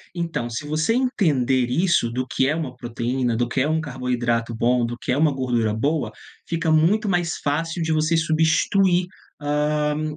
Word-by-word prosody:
Então, 160 -8 -3
se 115 +6 -5
você 155 +8 +1
entender 145 - +1
isso, 170 -4 +2
do 125 +2 -2
que 130 +1 +1
é 150 - +1
uma 145 -6 -4
proteína, 120 0 -2
do 120 - 0
que 130 +2 -1
é 145 - +2
um 160 - +1
carboidrato 120 -4 -2
bom, 120 +1 +1
do 120 +1 -4
que - - -4
é 130 - +1
uma 155 -1 +3
gordura 120 -5 0
boa, 140 0 -1 0.4
fica 165 -1 -1
muito 175 +8 +3
mais 175 -2 0
fácil 165 +4 -1
de 160 - -1
você 155 +2 +1
substituir, 165 +3 +2 0.4
hã, 150 +1 0
150 Hz, 175 wpm, -22 LUFS, 125-165 Hz, 0.4 s, uma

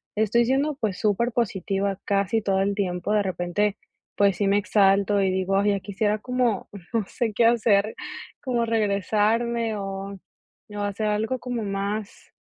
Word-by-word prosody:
"Estoy 220 +3 +2
siendo, 275 +4 +1
pues, 215 -8 -2
súper 220 +3 +1
positiva 195 -3 -1
casi 200 +2 +1
todo 195 -2 +1
el 200 +1 +1
tiempo", 185 -2 -2
de 210 -1 +3
repente, 190 +2 -1 0.4
pues, 200 -2 +3
sí 205 - +1
me 200 +1 +3
exalto 200 0 +3
y 190 - +2
digo: 190 +1 0
"Ay, 205 +1 +3
ya 200 - 0
quisiera 205 +2 -1
como 245 -3 -1 0.2
no 225 -2 +2
sé 230 -4 -2
qué 230 - +3
hacer, 220 -3 +3 0.5
como 245 -3 0
regresarme 220 +2 +1
o, 195 0 -5 0.5
o 205 0 -7
hacer 205 +1 -2
algo 220 +5 0
como 245 -3 -3
más, 200 +1 -4
205 Hz, 160 wpm, -25 LUFS, 195-225 Hz, 0.5 s, de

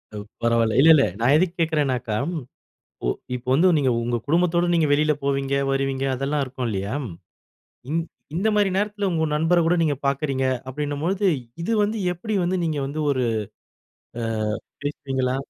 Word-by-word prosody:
அவ் 105 - -5 0.2
பரவால்ல. 115 -1 +2
இல்ல, 155 +4 +7
இல்ல. 140 - +4 0.2
நான் 130 +5 +4
எதுக்கு 180 0 +1
கேட்கிறேனாக்கா, 135 -8 0 0.9
ஒ - - +1 0.3
இப்ப 125 - -12
வந்து 165 +8 +5
நீங்க 135 -3 +2
உங்க 120 +1 -1
குடும்பத்தோட 170 +2 +2
நீங்க 160 -2 +3
வெளில 150 +1 +3
போவீங்க 140 0 0 0.2
வருவீங்க, 135 0 -1
அதெல்லாம் 140 +3 -1
இருக்கும் 130 -1 -5
இல்லயா! 100 +4 -3 1.0
இந் 165 +2 +1 0.3
இந்தமாரி 205 +1 +2
நேரத்தில 205 0 -1
உங்க 160 -1 0
நண்பருகூட 165 +2 +3
நீங்க 145 -3 +1
பார்க்கிறீங்க 135 -1 0 0.2
அப்பிடின்னம்பொழுது, 150 +8 -2 0.4
இது 225 - -2
வந்து 215 +2 -1 0.2
எப்பிடி 210 +5 -4
வந்து 185 +2 0
நீங்க 155 -3 -1
வந்து 150 +3 -5
ஒரு 130 -2 0 1.0
அ - - -3 0.6
பேசுவீங்களா? 135 -3 -2
145 Hz, 145 wpm, -23 LUFS, 130-170 Hz, 1.0 s, இல்ல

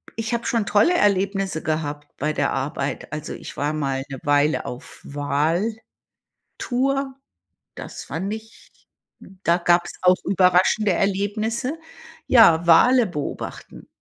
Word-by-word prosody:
ich 225 +1 -3
habe 235 - -2
schon 230 -3 0
tolle 210 - +3
Erlebnisse 195 - +1
gehabt 150 -2 -3
bei 150 +2 -1
der - - 0
Arbeit. 140 0 -3
Also, 150 0 -5
ich - - -9
war 145 +2 -1
mal 135 -3 -2
'ne 135 - -7
Weile 145 +2 +2
auf 125 - -9
Wal-Tour, 155 +10 -2 1.7
das - - -8
fand 190 +6 -4
ich 220 0 -11 0.7
da 170 +1 +3
gab's 175 0 +1
auch 180 0 +5
überraschende 190 +2 +3
Erlebnisse. 215 - -1 0.5
Ja, 170 -9 +6
Wale 240 +8 +6
beobachten. 150 -6 -7
180 Hz, 120 wpm, -22 LUFS, 150-215 Hz, 1.7 s, Ja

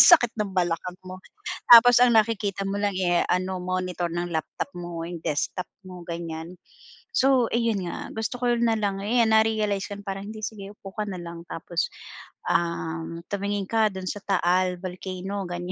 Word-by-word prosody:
Sakit 310 -10 +7
ng 205 -2 -1
balakang 180 +1 -1
mo. 185 0 -7 0.5
Tapos 240 0 +10
ang 240 -2 +5
nakikita 210 -3 +2
mo 200 - -2
lang, 205 -2 0
eh, 175 -2 +2
ano, 185 +1 0
monitor 180 -1 -2
ng 175 0 -2
laptop 160 +3 -3
mo, 175 -1 -5
'yong 175 0 -6
desktop 180 +5 -1 0.2
mo, 180 -1 -9
ganyan. 170 0 -5 0.6
So, 260 -3 +4
ayun 230 -6 +1
nga, - - -5
gusto 225 +3 -3
ko 245 -1 +2
na 230 -1 +3
lang 200 -2 -1
'yan 230 +1 +3
na-realize 215 -3 +2
kong 200 0 -6
parang, 195 +1 -4
"Hindi, 215 -1 -8
sige 200 -2 -7
upo 195 -2 -11
ka 215 -1 -1
na 185 -3 -5
lang. 170 0 -8
Tapos, 170 +2 -2 0.6
um, 165 0 -1
tumingin 200 0 -1
ka 225 -1 +4
do'n 190 -1 -6
sa 205 - -4
Taal 180 -1 +2
Volcano." 185 +1 -5
Ganyan. 175 +1 -4
190 Hz, 170 wpm, -26 LUFS, 175-215 Hz, 0.6 s, Tapos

